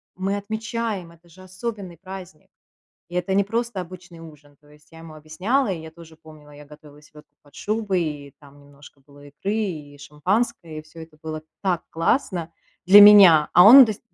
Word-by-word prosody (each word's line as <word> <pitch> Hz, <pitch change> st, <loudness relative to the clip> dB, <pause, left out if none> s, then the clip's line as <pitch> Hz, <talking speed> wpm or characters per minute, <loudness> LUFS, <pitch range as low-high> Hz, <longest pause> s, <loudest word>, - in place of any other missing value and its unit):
мы 195 Hz, +2 st, -3 dB
отмечаем, 220 Hz, -3 st, -5 dB
это 170 Hz, +1 st, -23 dB
же 185 Hz, +3 st, -18 dB
особенный 185 Hz, -2 st, -8 dB
праздник, 185 Hz, -3 st, -12 dB, 0.6 s
и 175 Hz, -, -13 dB
это 180 Hz, +2 st, -2 dB
не 200 Hz, -, +2 dB
просто 230 Hz, 0 st, -4 dB
обычный 175 Hz, -1 st, -12 dB
ужин". 150 Hz, -3 st, -16 dB
То 145 Hz, -, -26 dB
есть 150 Hz, +1 st, -23 dB
я 165 Hz, -, -16 dB
ему 165 Hz, -1 st, -13 dB
объясняла, 185 Hz, -, -2 dB
и 170 Hz, -, -7 dB
я 160 Hz, 0 st, -11 dB
тоже 160 Hz, -1 st, -17 dB
помнила, 155 Hz, -2 st, -18 dB
я 145 Hz, 0 st, -15 dB
готовила 150 Hz, 0 st, -17 dB
селёдку 150 Hz, 0 st, -20 dB
под 145 Hz, -1 st, -25 dB
шубой, 210 Hz, -4 st, -3 dB
и 145 Hz, -3 st, -7 dB
там 145 Hz, 0 st, -19 dB
немножко 145 Hz, 0 st, -19 dB
было 145 Hz, +1 st, -19 dB
икры 150 Hz, +8 st, -6 dB
и 155 Hz, -10 st, -6 dB
шампанское, 160 Hz, +2 st, -4 dB
и -, -, -9 dB
всё 160 Hz, +1 st, -16 dB
это 160 Hz, -1 st, -16 dB
было 155 Hz, 0 st, -7 dB, 0.2 s
так 180 Hz, -4 st, -1 dB
классно 170 Hz, -, -2 dB, 0.3 s
для 200 Hz, +3 st, +8 dB
меня, 190 Hz, -7 st, +7 dB
а 180 Hz, -, +6 dB
он 260 Hz, +5 st, +9 dB
д 220 Hz, -, -3 dB
всё -, -, -15 dB
170 Hz, 190 wpm, -21 LUFS, 150-195 Hz, 0.6 s, он